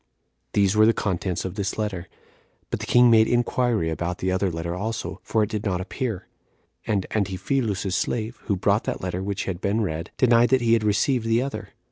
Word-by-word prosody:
These 100 -1 +3
were 110 0 +6
the 115 - +5
contents 90 -3 -2
of 95 - -4
this 100 -1 -3
letter; 100 -5 -3 0.6
but - - -2
the - - -6
king 120 -1 +6
made 110 -1 +6
inquiry 120 -6 +1
about 85 +2 -3
the 95 - -1
other 95 +1 +1
letter 85 0 -4
also, 110 +5 -4
for 110 -1 +1
it 105 - -2
did 105 -1 -3
not 95 -4 -1
appear; 100 0 -4 0.6
and 100 -4 0
Antiphilus's 100 0 -1
slave, 115 +4 -2
who 100 - +1
brought 100 +3 +1
that - - -3
letter 90 0 -3
which 100 0 -3
had 90 -2 -4
been 105 +2 0
read, 80 -4 -3
denied 120 -1 +4
that 130 -1 +3
he 115 -1 +3
had 115 -2 +3
received 115 +3 +1
the 115 +2 +2
other. 140 - -5
105 Hz, 200 wpm, -24 LUFS, 95-115 Hz, 0.6 s, were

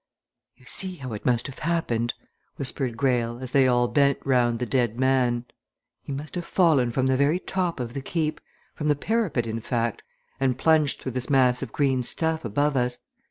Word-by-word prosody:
"You - - -22
see 190 -1 0
how 130 -7 -7
it 105 - -5
must 120 -2 +2
have 140 - -7
happened," 120 -9 -1 0.4
whispered 130 -3 -2
Greyle, 120 -2 +1
as 130 0 -6
they 135 -1 +4
all 120 -1 +3
bent 140 +1 +3
round 120 -3 +2
the 125 - -2
dead 120 -2 0
man. 125 -2 +2 0.6
"He - - -8
must 145 +3 -6
have 175 - -3
fallen 155 -11 +3
from 130 +2 0
the 130 0 +3
very 140 +5 +3
top 180 -4 -2
of 120 -1 -4
the 135 - -4
Keep 155 +2 -2 0.3
from 150 - -3
the 150 - +4
parapet, 190 - 0
in 115 0 -3
fact 115 0 -2 0.4
and 130 -2 +1
plunged 155 0 +3
through 130 - -4
this 130 +1 -3
mass 130 -3 +3
of - - -5
green 135 -3 +1
stuff 160 +5 -2
above 145 +6 0
us. 125 -1 0
130 Hz, 195 wpm, -25 LUFS, 120-150 Hz, 0.6 s, they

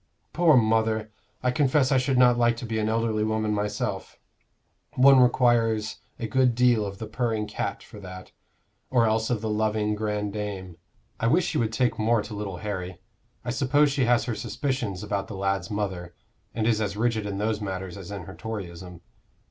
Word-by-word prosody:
"Poor 165 -4 +5
mother! 110 -1 +1 0.3
I 125 - +2
confess 135 0 +2
I 135 - +4
should 130 0 0
not 125 -1 +6
like 120 -1 +2
to 120 - -6
be 110 -1 -2
an 110 0 0
elderly 110 -1 0
woman 110 0 0
myself. 105 0 -3 0.8
One 135 +1 +7
requires 120 -3 +3 0.2
a 115 - -4
good 125 +1 +2
deal 120 -4 +3
of 100 0 -7
the 110 - -6
purring 110 -1 -1
cat - - -4
for 105 - -12
that, 95 -1 -10 0.6
or 120 -3 +3
else 110 0 +1
of 120 -4 0
the 110 - -2
loving 105 0 0
grandame. 105 -4 -4 0.4
I 115 - +1
wish 160 +8 +3
she - - -1
would 115 -2 0
take 120 +1 0
more 110 0 +2
to 105 - -8
little 100 -3 -5
Harry. 95 -3 -5 0.5
I 120 - -1
suppose 140 +3 +3
she 135 -2 +1
has 120 -2 +3
her 120 -1 -2
suspicions 120 -7 -3
about 100 -1 -2
the 105 - -7
lad's 95 -2 -1
mother, 95 -4 -4 0.4
and 110 -1 0
is 110 -1 +2
as 100 -1 -2
rigid 110 -2 0
in 100 -1 -4
those 105 +1 -1
matters 95 -3 -4
as 95 -2 -9
in 100 -3 -6
her 95 - -10
Toryism. 90 -6 -7
110 Hz, 190 wpm, -26 LUFS, 105-120 Hz, 0.8 s, One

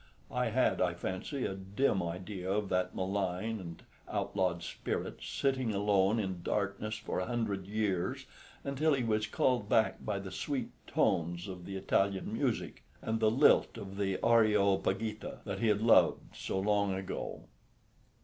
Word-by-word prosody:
I 125 0 0
had, 125 +3 +2
I 90 -1 +2
fancy, 95 +10 -3
a - - -2
dim 95 +3 0
idea 90 +2 -4
of 105 0 0
that 90 0 0
malign 95 +3 -1
and 85 -3 -9 0.3
outlawed 90 -3 -1
spirit - - -4
sitting 130 -5 0
alone 100 +1 +3
in 95 -5 -2
darkness 105 +3 -1
for - - -3
a 90 - -2
hundred 110 -6 -2
years, 100 -4 -1 0.4
until 140 +2 +2
he 130 - -1
was 110 -2 +1
called 120 -1 +1
back 110 -1 +2
by 105 -2 -1
the 95 -1 -6
sweet 130 +6 -3 0.2
tones 85 0 +1
of 90 -2 -7
the 100 - -5
Italian 95 0 0
music, - - -1 0.2
and 110 0 -2
the 110 -1 +4
lilt 115 +5 +4
of 95 0 -7
the 95 -2 0
"Areopagita" 105 -1 +2
that 100 -1 -3
he 115 - +1
had 105 0 +2
loved 115 - +4
so 95 - -2
long 100 -1 +2
ago. 95 0 -5
100 Hz, 155 wpm, -32 LUFS, 95-110 Hz, 0.4 s, the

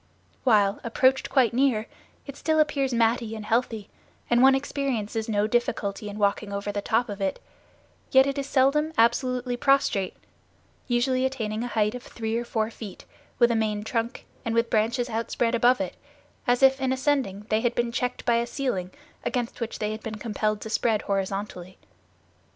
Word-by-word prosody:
While, 210 -5 +3
approached 260 +3 +2
quite 250 -5 +3
near, 245 -4 +2 0.4
it 280 - -8
still 315 +2 +1
appears 280 -3 +1
matty 230 -1 +1
and 215 -1 -7
heathy, 225 -2 0 0.4
and 240 0 +5
one 265 +1 +7
experiences 240 -6 -2
no 205 -1 +2
difficulty 215 -3 -1
in 205 - -7
walking 200 0 0
over 200 +1 -3
the 205 0 -3
top 225 +4 +1
of 205 -2 -6
it, 195 -1 -1 0.7
yet 265 0 +6
it 275 0 -2
is 275 - -3
seldom 300 +4 +2
absolutely 245 +1 +2
prostrate, 245 -8 +2 0.7
usually 255 +1 +1
attaining 230 -4 -2
a - - -2
height 215 -2 +1
of 250 - -6
three 225 -2 -4
or 240 +1 -1
four 220 -1 -1
feet 215 -4 -9 0.3
with 240 -1 +5
a - - +1
main 215 -2 0
trunk, 230 +2 -3 0.2
and 230 -1 -2
with 230 0 +1
branches 230 +3 +1
outspread 230 0 -1
above 240 +2 +4
it, 185 -2 -3 0.5
as 245 +2 +2
if 265 0 +5
in 260 -1 +1
ascending 260 -7 0
they 215 +1 +2
had 240 0 0
been 235 -1 0
checked 250 +1 -2
by 235 -1 +3
a 235 0 0
ceiling 235 -9 -2 0.3
against 245 -2 -3
which 230 - -3
they 210 0 -2
had 215 0 -6
been 220 -1 -5
compelled 215 -1 -2
to 220 - -6
spread 225 -2 +1
horizontally. 195 -2 -3
230 Hz, 180 wpm, -26 LUFS, 215-255 Hz, 0.7 s, one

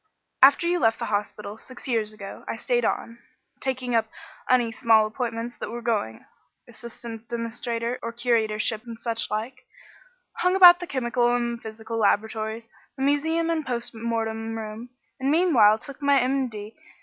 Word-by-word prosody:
After 275 +5 +7
you 350 +1 +1
left 225 -3 +3
the - - -3
hospital, 205 +1 -3
six 255 +2 -11
years 225 -4 0
ago, 205 -2 -9
I - - -3
stayed 485 -1 0
on, 230 0 -2 0.4
taking 255 -2 -2
up 225 -1 +2 0.4
any 245 -2 +3
small 225 -2 +4
appointments 230 +1 -4
that - - -5
were 235 +1 -6
going 210 - -2 0.4
assistant 235 -1 -10
demonstrator 235 0 -3
or 230 - -4
curatorships 225 -1 0
and 230 -1 -7
such 230 -1 -1
like 225 +5 -4 0.7
hung 360 +1 +2
about 355 -2 +9
the 355 - -6
chemical 240 -3 +1
and 235 -1 -2
physical 220 +1 -6
laboratories, 220 +1 0 0.3
the 270 - -2
museum 320 +4 +1
and 320 -2 -1
post 240 -3 -3
mortem 225 0 -3
room, 220 +2 -7 0.3
and 265 +1 0
meanwhile 285 - +5
took 280 +5 -9
my 280 -1 +4
M.D. 245 -5 -2
235 Hz, 155 wpm, -25 LUFS, 220-260 Hz, 0.7 s, about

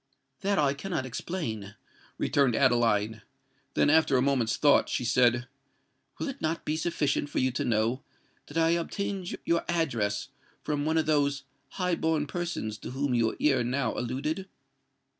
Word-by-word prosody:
"That 200 0 0
I 140 -2 +3
cannot 160 -2 -3
explain," 115 - -4 0.4
returned 135 -5 +2
Adeline: 115 -4 +2 0.5
then, - - +4
after 155 -4 +4
a - - +3
moment's 130 -5 +1
thought, 145 -1 +4
she 125 - -1
said, 120 0 +3 0.7
"Will - - -3
it 275 -1 -6
not 160 +1 -2
be 155 - 0
sufficient 155 -3 0
for - - -5
you 130 0 +2
to 125 - -2
know 115 +3 +1 0.5
that 145 - -6
I 165 0 +4
obtained 180 +2 -2
your 170 0 +2
address 130 -11 0 0.3
from 145 -1 -1
one 160 +1 +1
of 160 - +2
those 145 -2 +1 0.3
high 180 -2 +1
born 160 -2 +1
persons 145 - -4
to - - -7
whom 135 +1 -1
you 115 -2 +1
ere 135 -5 +3
now 125 0 -1
alluded?" 145 +10 -3
140 Hz, 160 wpm, -28 LUFS, 120-160 Hz, 0.7 s, then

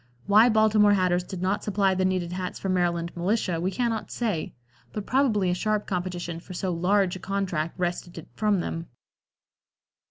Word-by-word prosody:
Why 215 +4 +6
Baltimore 215 -2 +4
hatters 180 -2 +2
did 185 0 -6
not 195 +2 0
supply 200 -2 +2
the 185 0 +1
needed 185 -2 0
hats 180 0 -4
for 195 - -4
Maryland 170 -2 0
militia 180 -1 0
we 180 - +1
cannot 230 +1 -2
say, 210 -10 -2 0.4
but 210 -2 -5
probably 225 -9 +2
a - - +2
sharp 210 +3 0
competition 175 -2 -3
for 180 +2 -10
so 185 +1 -2
large 180 +2 +2
a - - -7
contract 180 -5 -2
wrested 175 -1 -3
it 165 - -8
from 210 -4 +1
them. 165 -1 -4
185 Hz, 170 wpm, -26 LUFS, 175-205 Hz, 0.4 s, Why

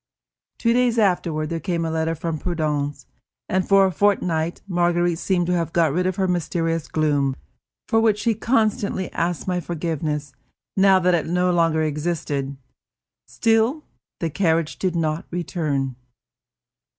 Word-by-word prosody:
Two 230 0 +2
days 245 -1 +2
afterward 175 -7 +1
there 165 - -1
came 165 +1 -2
a 160 - -2
letter 160 0 0
from 160 0 -3
Prudence, 150 -4 -2 0.4
and 185 0 0
for 195 -1 +6
a 190 - +1
fortnight 175 -4 0
Marguerite 175 -2 +1
seemed 180 -3 +1
to 180 - 0
have 165 -2 -1
got 165 -4 +3
rid 180 +3 +1
of 185 - -1
her 190 -1 0
mysterious 165 -2 -1
gloom, 145 -4 +1 0.5
for 225 - +3
which 220 -2 +3
she 225 +2 +1
constantly 215 -4 0
asked 170 +1 -2
my 180 -1 0
forgiveness, 155 -3 -3 0.4
now 195 0 +5
that 180 -1 +2
it 165 -3 +1
no 180 +2 +1
longer 165 -2 +2
existed. 150 -3 -2 0.7
Still, 225 +6 +1 0.4
the 165 -2 -2
carriage 165 -2 0
did 185 -2 -1
not 160 -1 -1
return. 150 -7 -2
170 Hz, 150 wpm, -22 LUFS, 160-190 Hz, 0.7 s, for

